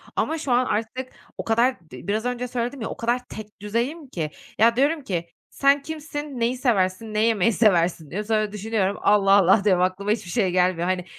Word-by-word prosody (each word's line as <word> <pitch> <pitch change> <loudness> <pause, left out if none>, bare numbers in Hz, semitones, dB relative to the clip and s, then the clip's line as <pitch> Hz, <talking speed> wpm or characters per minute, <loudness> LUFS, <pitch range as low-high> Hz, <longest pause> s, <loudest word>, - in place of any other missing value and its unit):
ama 320 - 0
şu 290 -4 -3
an 245 +1 +3
artık 250 +4 -3 0.3
o - - -4
kadar 235 +3 +2
d 125 +6 -10
biraz 215 +3 -1
önce 250 0 -2
söyledim 245 +2 -3
ya, 225 - -3
o - - -7
kadar 245 +2 -1
tek 215 -2 -10
düzeyim 240 +9 -2
ki, 160 -11 -4 0.3
ya, 230 +2 +4
diyorum 290 +4 +1
ki, 170 -6 -3 0.2
"Sen 280 +1 +3
kimsin, 295 -2 -6
neyi 235 +2 0
seversin, 215 -3 0
ne 210 - 0
yemeyi 225 -1 +2
seversin?" 175 -7 +2
diyorum. 210 +3 -4
Sonra 215 -2 +1
düşünüyorum, 210 -1 -1
"Allah, 200 -1 +4
Allah!" 195 +1 +5
diyorum, 185 -3 +3
"Aklıma 190 +3 -1
hiçbir 215 -5 -2
şey 195 -5 +1
gelmiyor." 180 -1 +1
Hani, 185 -1 -1
220 Hz, 200 wpm, -23 LUFS, 195-250 Hz, 0.3 s, Allah